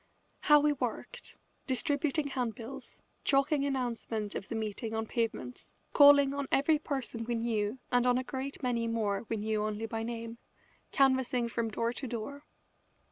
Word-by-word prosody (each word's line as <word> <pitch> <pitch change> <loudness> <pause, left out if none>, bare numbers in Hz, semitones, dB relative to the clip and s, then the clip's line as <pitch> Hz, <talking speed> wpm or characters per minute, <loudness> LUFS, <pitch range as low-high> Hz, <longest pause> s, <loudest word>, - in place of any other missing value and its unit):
How 295 0 +6
we 295 0 +3
worked, 275 - -5 0.3
distributing 290 +2 +1
handbills, 245 -1 -5 0.2
chalking 275 +1 +2
announcements 235 -6 -2
of 195 - -6
the 230 - -3
meeting 220 +1 -3
on 220 0 -1
pavements, 220 - -4 0.2
calling 285 -1 +7
on 280 -1 -3
every 300 +3 +3
person 265 -6 -4
we 235 +1 -2
knew 225 -1 -1
and 245 0 +3
on 245 0 +4
a 255 - -1
great 270 +2 -5
many 235 -2 0
more 220 -2 -1
we 225 - -1
knew 215 0 -1
only 215 +1 -2
by 225 0 -3
name, 230 0 -5 0.5
canvassing 260 -3 +2
from 230 -1 -1
door 230 +2 -1
to 265 - -5
door! 245 +6 -6
240 Hz, 155 wpm, -31 LUFS, 225-275 Hz, 0.5 s, calling